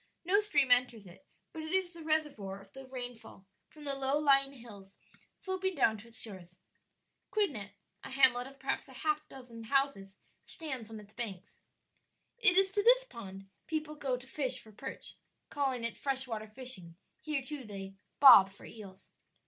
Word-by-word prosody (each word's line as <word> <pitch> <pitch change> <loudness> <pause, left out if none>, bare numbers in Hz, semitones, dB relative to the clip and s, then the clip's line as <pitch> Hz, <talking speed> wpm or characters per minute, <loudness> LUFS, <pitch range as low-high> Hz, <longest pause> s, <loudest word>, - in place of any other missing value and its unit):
No 390 +4 +4
stream 285 -11 +2
enters 245 -4 +3
it, 185 +10 -16 0.3
but 320 - -6
it 315 0 -6
is 370 -1 +1
the 340 - -11
reservoir 295 -12 -1
of 195 0 -18
the 270 0 -10
rainfall 245 -6 -8 0.2
from 300 - -13
the 280 -1 -1
low 275 +1 +1
lying 275 -2 +4
hills 205 -6 -13 0.4
sloping 375 -1 -2
down 220 -6 +3
to 225 - -13
its 230 -1 -8
shores. 185 -5 -4 0.7
Quidnet 240 - -1 0.3
a - - -7
hamlet 255 -2 +4
of 275 0 -14
perhaps 270 +1 -2
a 265 - -13
half 305 0 0
dozen 235 -4 -11
houses 230 -7 0 0.3
stands 265 -9 -5
on 220 -1 -8
its 210 0 -15
banks. 205 -7 -7 0.8
It 400 -5 +5
is 385 0 +5
to 410 - +1
this - - +6
pond 195 - -10 0.2
people 310 -1 -2
go 275 -4 -2
to 250 - -13
fish 265 -1 +2
for 220 - -14
perch; 205 - -8 0.3
calling 265 -4 -1
it 230 -1 -3
fresh 265 -1 +1
water 220 -2 -4
fishing; 215 -7 -6 0.2
here 300 -3 -2
too 290 0 -6
they 195 -3 -7 0.3
"bob" 205 -9 +10
for 195 - -15
eels. 200 -4 -12
260 Hz, 175 wpm, -32 LUFS, 215-300 Hz, 0.8 s, bob